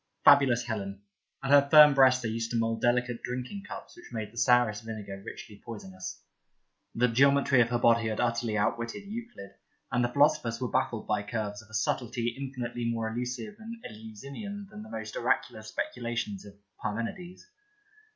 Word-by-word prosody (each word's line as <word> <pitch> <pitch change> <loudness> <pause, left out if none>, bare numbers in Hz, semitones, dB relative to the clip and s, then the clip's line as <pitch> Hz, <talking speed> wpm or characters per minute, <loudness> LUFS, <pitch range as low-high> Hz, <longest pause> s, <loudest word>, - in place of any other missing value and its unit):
Fabulous 135 -4 +6
Helen! 100 -4 -4 0.4
At 135 - -1
her 140 0 +7
firm 150 -1 +9
breasts 130 -2 +5
they 115 - -1
used 115 +1 -2
to 120 - -1
mould 115 0 0
delicate 125 0 +1
drinking 130 +11 -5
cups - - -9
which 350 - -14
made 110 -2 -4
the - - -20
sourest 120 -4 +4
vinegar 105 -3 -7
richly 105 -1 -10
poisonous. 95 -4 -8 0.7
The 125 +2 +3
geometry 135 +1 +4
of 115 - +2
her 120 - +1
body 115 -1 +4
had 110 - -3
utterly 115 -2 0
outwitted 115 - -1
Euclid, 225 - -8 0.4
and 125 +1 +2
the - - +3
Philosophers 120 -4 +2
were 125 - -3
baffled 120 -3 0
by 105 -1 0
curves 105 -1 -4
of 110 - -20
a 110 - -8
subtlety 120 +2 0
infinitely 125 -3 -4
more 115 -1 -1
elusive 125 - -4
and 225 +1 -7
Eleusinian 140 - -8
than 210 0 -9
the 220 - -10
most 110 - -6
oracular 110 - 0
speculations 110 -2 -4
of 100 -1 -12 0.3
Parmenides. 145 - -4
120 Hz, 170 wpm, -29 LUFS, 110-135 Hz, 0.7 s, firm